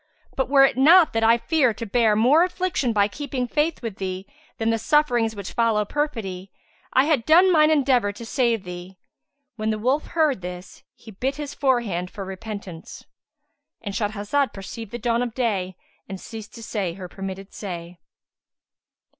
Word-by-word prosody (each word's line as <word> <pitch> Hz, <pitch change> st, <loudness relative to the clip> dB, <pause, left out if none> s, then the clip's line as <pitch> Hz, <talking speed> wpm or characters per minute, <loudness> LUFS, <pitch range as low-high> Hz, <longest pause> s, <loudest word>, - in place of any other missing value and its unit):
But, 265 Hz, -1 st, -1 dB
were 275 Hz, -1 st, +7 dB
it 270 Hz, -, 0 dB
not 325 Hz, +5 st, +6 dB
that 225 Hz, 0 st, 0 dB
I 230 Hz, +1 st, +5 dB
fear 255 Hz, -3 st, +1 dB
to 230 Hz, -, -5 dB
bear 225 Hz, 0 st, +2 dB
more 260 Hz, +10 st, +5 dB
affliction 360 Hz, -8 st, -1 dB
by 205 Hz, -2 st, +3 dB
keeping 255 Hz, +2 st, -4 dB
faith 300 Hz, +2 st, -1 dB
with 220 Hz, -4 st, -5 dB
thee 190 Hz, 0 st, -4 dB, 0.3 s
than 225 Hz, 0 st, +1 dB
the 225 Hz, -, 0 dB
sufferings 240 Hz, -6 st, +2 dB
which 200 Hz, -2 st, -7 dB
follow 225 Hz, -3 st, +2 dB
perfidy, 205 Hz, -10 st, -3 dB, 0.4 s
I 260 Hz, -, +4 dB
had 295 Hz, -6 st, +2 dB
done 355 Hz, +6 st, +6 dB
mine 305 Hz, -1 st, +5 dB
endeavour 260 Hz, -8 st, +2 dB
to 230 Hz, +3 st, -9 dB
save 235 Hz, -3 st, 0 dB
thee." 180 Hz, +1 st, -9 dB, 0.6 s
When 215 Hz, 0 st, -1 dB
the 215 Hz, -, 0 dB
wolf 260 Hz, +7 st, 0 dB
heard 310 Hz, -, +1 dB
this, 180 Hz, 0 st, -8 dB
he 225 Hz, -, -13 dB
bit 260 Hz, +7 st, -2 dB
his 290 Hz, -1 st, -6 dB
forehand 230 Hz, -10 st, 0 dB
for 200 Hz, -2 st, -7 dB
repentance. 190 Hz, -3 st, -8 dB, 0.7 s
—And 200 Hz, -3 st, -6 dB
Shahrazad 210 Hz, +7 st, -1 dB
perceived 200 Hz, +3 st, -8 dB
the 240 Hz, -, -4 dB
dawn 235 Hz, 0 st, 0 dB
of 240 Hz, -2 st, -3 dB
day 195 Hz, -7 st, -1 dB, 0.3 s
and 190 Hz, -1 st, -6 dB
ceased 220 Hz, +1 st, -10 dB
to 230 Hz, -, -9 dB
say 200 Hz, -6 st, -3 dB
her 185 Hz, 0 st, -8 dB
permitted 195 Hz, +1 st, -7 dB
say. 175 Hz, -3 st, -7 dB
225 Hz, 170 wpm, -23 LUFS, 195-270 Hz, 0.7 s, were